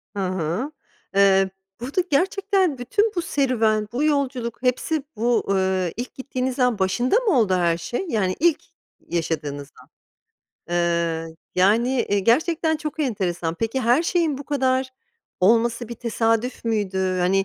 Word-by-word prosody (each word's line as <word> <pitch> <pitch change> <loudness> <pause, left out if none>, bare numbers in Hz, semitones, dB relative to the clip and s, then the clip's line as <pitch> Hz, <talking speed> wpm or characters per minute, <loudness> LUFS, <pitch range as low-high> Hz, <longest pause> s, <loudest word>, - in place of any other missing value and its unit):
Hı - - -3
hı. 185 - -2 0.4
Eee, 195 -1 +5 0.3
burada 270 +10 -1
gerçekten 375 0 +1
bütün 410 - +1
bu 350 - 0
serüven, 225 -9 +1
bu 255 +5 0
yolculuk 270 -6 -1
hepsi 265 +4 0
bu, 235 +2 +1
ııı, 190 -2 +1
ilk 245 +1 -6
gittiğiniz 260 -1 -3
an 250 -4 +2
başında 240 - +1
mı 415 - +2
oldu 205 -5 +2
her 170 -2 +2
şey, 175 - -4
yani 190 -7 0
ilk 330 0 +3 0.5
yaşadığınız 150 -4 -3
an? - - -20 0.9
Iıı, 170 -1 0 0.2
yani, 210 +7 +3 0.2
eee, 205 - +2
gerçekten 315 - +2
çok 305 0 -5
enteresan. 180 - -1
Peki, 225 +7 -2
her 245 +5 +3
şeyin 335 -5 0
bu 285 - -8
kadar 260 -2 0 0.5
olması 230 +4 +2
bir 235 - -5
tesadüf 230 +1 -1
müydü? 190 -4 0
Hani, 190 +2 +2
235 Hz, 140 wpm, -23 LUFS, 190-270 Hz, 0.9 s, Eee